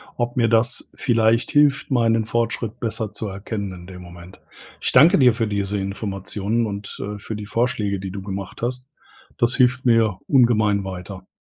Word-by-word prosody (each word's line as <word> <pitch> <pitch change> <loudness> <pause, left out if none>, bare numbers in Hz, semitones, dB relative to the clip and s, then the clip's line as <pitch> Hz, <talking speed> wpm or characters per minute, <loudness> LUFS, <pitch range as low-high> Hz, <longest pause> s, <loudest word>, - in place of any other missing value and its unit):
ob 120 0 -3
mir 115 -2 +3
das 115 +1 +4
vielleicht 115 -1 +2
hilft, 145 -2 +2
meinen 115 -3 +2
Fortschritt 115 0 -2
besser 110 -2 0
zu 110 - -3
erkennen 100 0 -6
in 90 -1 -12
dem 90 -1 -11
Moment. 90 +1 -13 0.4
Ich - - +2
danke 160 +9 +6
dir 125 -4 +5
für 115 -1 -2
diese 100 0 -2
Informationen 100 +2 -3
und, 100 -1 -6
äh, 105 0 -6
für 110 - -7
die 105 0 -7
Vorschläge, 105 -3 -1
die 95 0 -6
du 100 +1 -7
gemacht 95 0 -7
hast. 125 +2 -3 0.5
Das 120 -1 +3
hilft 125 -1 +2
mir 115 -5 +2
ungemein 110 -6 +3
weiter. 95 0 -8
110 Hz, 175 wpm, -21 LUFS, 100-120 Hz, 0.5 s, danke